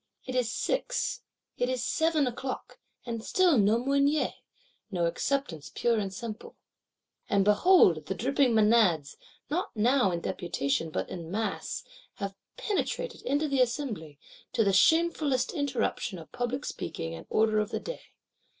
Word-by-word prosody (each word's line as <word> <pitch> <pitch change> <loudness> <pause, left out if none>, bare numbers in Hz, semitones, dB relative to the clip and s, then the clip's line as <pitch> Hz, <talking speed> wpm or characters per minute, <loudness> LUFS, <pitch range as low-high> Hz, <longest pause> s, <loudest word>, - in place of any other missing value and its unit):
It 255 - -5
is 250 -3 +1
six, - - -1 0.4
it 245 - +1
is 255 -2 -1
seven 320 +1 +2
o'clock; 255 +1 -5 0.3
and 230 -2 -4
still 365 0 +3
no 210 +2 +4
Mounier, 280 +2 +2 0.6
no 175 -4 0
Acceptance 170 - -2
pure 235 -2 +2
and 195 -2 -2
simple. 220 +2 -7 0.7
And, 200 -2 +3
behold, 210 - +5
the 190 - -2
dripping 270 +1 +2
Menads, 210 -9 +3 0.4
not 350 +5 0
now 240 0 +3
in 170 -2 -1
deputation 160 -3 -1
but - - -3
in 165 -2 -6
mass, 210 +1 -3 0.3
have 200 -1 -4 0.2
penetrated 465 +3 -2
into 290 +3 0
the 275 -2 +2
Assembly: 235 - -2 0.4
to 225 - +3
the 200 -2 +2
shamefullest 300 - +3
interruption 265 - -1
of 160 - -12
public 245 +3 -3
speaking 80 0 -5
and 80 - -9
order 215 0 +3
of 210 0 -1
the - - -2
day. - - -6
235 Hz, 145 wpm, -29 LUFS, 195-280 Hz, 0.7 s, behold